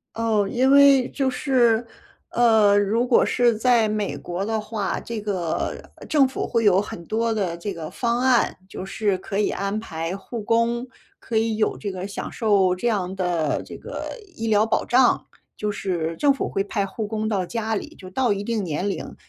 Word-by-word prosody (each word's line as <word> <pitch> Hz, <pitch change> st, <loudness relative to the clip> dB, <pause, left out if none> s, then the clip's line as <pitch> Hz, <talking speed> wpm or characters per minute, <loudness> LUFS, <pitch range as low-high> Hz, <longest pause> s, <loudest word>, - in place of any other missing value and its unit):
哦， 225 Hz, -3 st, +1 dB
因 255 Hz, +2 st, +2 dB
为 280 Hz, -2 st, +6 dB
就 270 Hz, -2 st, 0 dB
是， 245 Hz, -4 st, +2 dB, 0.5 s
呃， 220 Hz, -4 st, +4 dB
如 220 Hz, +5 st, +1 dB
果 250 Hz, -, +4 dB
是 240 Hz, -2 st, +2 dB
在 235 Hz, -1 st, +3 dB
美 210 Hz, -1 st, -2 dB
国 180 Hz, +3 st, -4 dB
的 220 Hz, +1 st, -1 dB
话， 215 Hz, -3 st, -3 dB
这 230 Hz, -2 st, -5 dB
个 185 Hz, -6 st, -2 dB, 0.3 s
政 285 Hz, -3 st, +4 dB
府 265 Hz, -, -4 dB
会 230 Hz, -2 st, 0 dB
有 195 Hz, -1 st, +5 dB
很 170 Hz, -4 st, -8 dB
多 225 Hz, +1 st, 0 dB
的 185 Hz, -6 st, -2 dB
这 195 Hz, +3 st, -4 dB
个 160 Hz, -2 st, -6 dB
方 235 Hz, -1 st, -1 dB
案， 255 Hz, -1 st, +2 dB
就 190 Hz, -, -7 dB
是 200 Hz, -1 st, 0 dB
可 195 Hz, +2 st, -4 dB
以 210 Hz, -, +2 dB
安 200 Hz, +2 st, -2 dB
排 165 Hz, -4 st, -4 dB
护 230 Hz, +3 st, -7 dB
工， 230 Hz, +2 st, +1 dB, 0.3 s
可 225 Hz, -, -3 dB
以 225 Hz, 0 st, +1 dB
有 215 Hz, -, 0 dB
这 200 Hz, -3 st, -5 dB
个 185 Hz, +1 st, -5 dB
享 200 Hz, -, -5 dB
受 200 Hz, -5 st, +2 dB
这 240 Hz, +6 st, -1 dB
样 190 Hz, -4 st, -1 dB
的 175 Hz, -5 st, -1 dB
这 -, -, -9 dB
个 -, -, -6 dB, 0.3 s
医 225 Hz, 0 st, -4 dB
疗 215 Hz, 0 st, +4 dB
保 225 Hz, -, 0 dB
障。 250 Hz, 0 st, +3 dB, 0.3 s
就 210 Hz, 0 st, -2 dB
是 170 Hz, -5 st, -2 dB
政 285 Hz, -1 st, +4 dB
府 270 Hz, -, -3 dB
会 195 Hz, -, -1 dB
派 200 Hz, -1 st, -2 dB
护 215 Hz, +3 st, -4 dB
工 215 Hz, +1 st, -2 dB
到 195 Hz, -4 st, 0 dB
家 225 Hz, +2 st, -2 dB
里， -, -, -4 dB
就 185 Hz, -, -11 dB
到 235 Hz, +3 st, +1 dB
一 200 Hz, 0 st, -4 dB
定 225 Hz, -1 st, -1 dB
年 180 Hz, +3 st, -2 dB
龄。 -, -, -5 dB
215 Hz, 210 characters per minute, -23 LUFS, 195-235 Hz, 0.5 s, 为